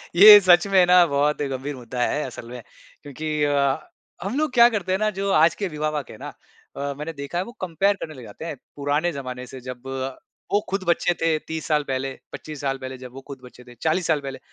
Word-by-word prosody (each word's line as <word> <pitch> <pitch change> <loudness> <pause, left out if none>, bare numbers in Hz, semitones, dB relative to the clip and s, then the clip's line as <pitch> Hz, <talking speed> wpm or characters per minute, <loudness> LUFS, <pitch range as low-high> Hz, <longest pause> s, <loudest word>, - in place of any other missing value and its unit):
ये 205 +3 +11
सच 175 +1 +5
में 190 -2 +5
ना 180 0 +6
बहुत 145 0 0
ही 145 - 0
गंभीर 135 +2 -4
मुद्दा 125 0 -6
है 150 - 0
असल 120 -2 -8
में। 125 0 -8 0.4
क्योंकि 150 +2 -3
अ, 140 -2 +2 0.5
हम 215 +8 -3
लोग 310 -3 0
क्या 235 -1 +8
करते 190 -5 -3
हैं 190 - +1
ना 215 0 +2
जो 200 0 0
आज 160 0 +4
के 200 - -2
विवाहक 150 -2 -3
है - - -11
ना - - -8 0.5
अ, 140 0 -3
मैंने 155 +3 -5
देखा 140 +4 -6
है 180 - 0
वो 235 - -10
कम्पेयर 190 +3 +1
करने 155 - -6
लग 130 -3 -11
जाते 110 +9 -10
हैं 160 - -4 0.2
पुराने 145 +4 0
ज़माने 125 -3 -6
से। 130 +1 -9
जब 125 +1 -9 0.7
वो 205 - +5
ख़ुद 195 -1 -1
बच्चे 170 +1 +2
थे 165 -1 +2
30 160 0 -4
साल 150 -2 +2
पहले, 135 -1 -3 0.2
25 155 -2 -8
साल 135 -1 -1
पहले, 130 0 -7
जब 125 -1 -10
वो 135 - -9
ख़ुद 140 -2 -9
बच्चे 125 0 -14
थे 120 0 -15
40 165 +2 0
साल 155 -3 +2
पहले। 135 -1 -7
150 Hz, 235 wpm, -23 LUFS, 135-175 Hz, 0.7 s, ये